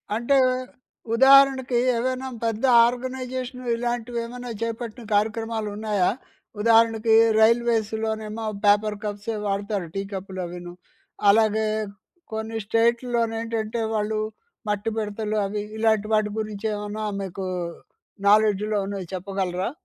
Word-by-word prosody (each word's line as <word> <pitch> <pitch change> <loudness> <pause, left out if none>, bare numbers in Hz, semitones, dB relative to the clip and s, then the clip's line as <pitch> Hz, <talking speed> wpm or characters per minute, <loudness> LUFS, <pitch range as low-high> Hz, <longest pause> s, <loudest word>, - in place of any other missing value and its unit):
అంటే 240 +5 +2 0.8
ఉదాహరణకి, 265 -1 +6 0.2
ఏవైనా 255 +2 -2 0.2
పెద్ద 225 0 -2 0.2
ఆర్గనైజేషన్ 255 0 -4
ఇలాంటివి 240 0 -3
వేమన్నా 245 +1 -6
చేపట్టిన 230 +1 -4
కార్యక్రమాలు 220 +1 -1
ఉన్నాయా? 210 -4 +1 0.5
ఉదాహరణకి, 225 0 +4 0.2
రైల్వేస్‌లోనేమో 220 -1 +1 0.2
పేపర్ 210 +1 +3
కప్సే 210 +1 -4
వాడతారు, 200 -2 -2
టీకప్పు‌లు 195 -1 -5
అవిను. 175 0 -8 0.6
అలాగే 220 +1 +3 0.7
కొన్ని 220 +1 -4
స్టేటుల్లో 235 +2 +1
నేంటంటే 225 0 -3
వాళ్ళు 215 0 -1 0.5
మట్టి 210 +1 -1
బిడతలు 215 0 -2
అవి 205 +1 -3 0.2
ఇలాంటి 220 -1 +2
వాటి 215 -1 +2
గురించి 215 -1 -5
ఏమన్నా 210 +1 -4 0.2
మీకు 190 0 -5 0.8
నాలెడ్జ్‌లో 210 0 +3
ఉన్నాయి 195 -2 -5
చెప్పగలరా? 185 0 -2
220 Hz, 100 wpm, -24 LUFS, 205-230 Hz, 0.8 s, ఉదాహరణకి